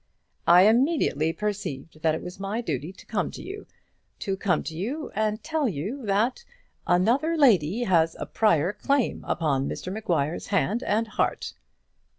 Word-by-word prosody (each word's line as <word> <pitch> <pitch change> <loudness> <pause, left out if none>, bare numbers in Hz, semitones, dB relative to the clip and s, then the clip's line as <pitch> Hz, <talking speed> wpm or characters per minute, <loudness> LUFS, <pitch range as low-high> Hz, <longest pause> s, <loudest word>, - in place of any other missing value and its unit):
"I 175 +2 +8
immediately 225 - +3
perceived 165 -7 -5
that 160 -1 +2
it - - -6
was 180 +2 -8
my 200 +3 -2
duty 155 - -3
to 190 - -16
come - - -1
to - - -9
you; 410 +2 -8 0.5
to 195 - -2
come 190 -4 0
to 160 - -6
you 255 - -4
and 215 +1 -1
tell 310 -4 0
you 205 - -4
that 220 - +1 0.4
another 245 - +2
lady 220 - +4
has 165 -6 +2
a - - -3
prior 180 -4 +2
claim 275 0 0
upon 140 -4 0
Mr 185 - -5
Maguire's 170 -7 -1
hand 205 +3 +1
and 225 -1 0
heart." 215 - -1
200 Hz, 160 wpm, -26 LUFS, 165-240 Hz, 0.5 s, I